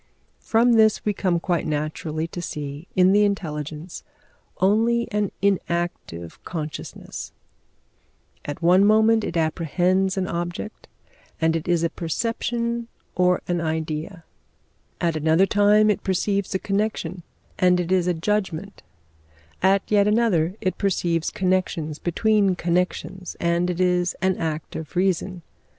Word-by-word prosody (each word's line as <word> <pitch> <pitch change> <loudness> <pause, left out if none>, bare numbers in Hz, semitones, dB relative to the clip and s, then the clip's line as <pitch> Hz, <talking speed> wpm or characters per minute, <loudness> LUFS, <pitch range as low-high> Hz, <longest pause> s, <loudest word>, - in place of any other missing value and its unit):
From 235 +2 +3
this 220 -2 +4
we 210 - +1
come 180 -3 0
quite 175 -1 -1
naturally 155 +1 -2
to 175 - -6
see 150 0 -6
in 185 0 +5
the 205 +1 +5
intelligence 160 -4 -3 0.6
only 230 +4 +2
an 210 -2 0
inactive 170 - -2
consciousness; 155 -3 -6 1.1
at 145 +3 -6
one 180 +3 +6
moment 220 +1 +4
it 170 - -3
apprehends 180 +4 +1
an 190 - 0
object, 175 +4 -5 0.5
and 160 0 +2
it 165 +1 -3
is 175 -1 +2
a 170 - +2
perception 235 +6 -2 0.3
or 180 0 +2
an 175 -1 0
idea; 160 +2 -3 0.8
at 170 -2 0
another 160 +4 +3
time 210 +1 +4
it 205 - -3
perceives 195 +1 0
a - - +4
connection, 195 -3 -2 0.4
and 180 -1 +4
it 180 0 -2
is 185 -2 +2
a 180 - +2
judgment; 200 +1 -2 0.8
at 195 +1 +4
yet 205 -1 +3
another, 205 -6 +2
it 185 - -2
perceives 175 -4 0
connections 180 -5 -1
between 200 +2 +2
connections, 180 +1 -2
and 170 +1 +1
it 180 0 -3
is 180 -1 +2
an 190 +1 +1
act 160 -1 -4
of 160 +1 -7
reason. 185 -1 0
180 Hz, 135 wpm, -23 LUFS, 165-200 Hz, 1.1 s, one